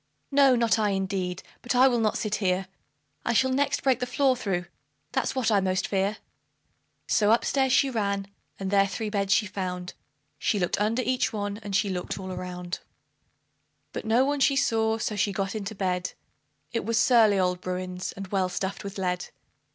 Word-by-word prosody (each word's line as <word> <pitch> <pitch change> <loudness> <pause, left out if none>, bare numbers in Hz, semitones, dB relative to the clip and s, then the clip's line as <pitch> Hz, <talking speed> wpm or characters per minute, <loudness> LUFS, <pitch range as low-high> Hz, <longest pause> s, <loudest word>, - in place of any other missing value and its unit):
No, 275 -2 +6
not 235 -2 +2
I, 210 -1 +2
indeed; 190 -2 -2 0.2
but 245 - -2
I 255 +2 +7
will 245 -2 +2
not 215 -2 +1
sit 215 -2 -3
here 190 -1 0 0.6
I 235 - 0
shall 260 +3 +3
next 280 +2 +1
break 260 -3 +3
the 250 - -2
floor 260 +1 +2
through 190 -7 -2 0.5
that's - - -1
what 240 -4 +1
I 205 - +5
most 185 -1 0
fear;" 200 +2 0 0.9
So 210 -2 +2
up 230 +2 +4
stairs 265 -2 +2
she 275 - +4
ran, 200 -5 -1 0.3
and 195 0 -3
there 195 -1 +4
three 215 +1 -4
beds 200 -2 0
she 205 - +4
found 180 -2 -4 0.5
She 210 - +1
looked 180 +1 0
under 225 +4 +1
each 255 0 +1
one, 205 -1 -3
and 205 -3 -4
she 200 - +2
looked 180 -2 -3
all 190 -1 -6
around; 180 -1 -5 1.1
But - - -4
no 235 +4 +3
one 285 +1 0
she 275 0 +4
saw, 225 -4 +2
so 215 -1 -2
she 205 0 +1
got 195 0 -2
into 215 0 -5
bed 180 -2 -1 0.6
It 230 - -1
was 225 +2 0
surly 220 -4 +5
old 180 -1 +1
Bruin's, 180 0 -4
and 195 - -7
well 190 -2 +1
stuffed 190 +2 -3
with 200 0 -7
lead. 180 -2 -1
205 Hz, 190 wpm, -27 LUFS, 190-230 Hz, 1.1 s, I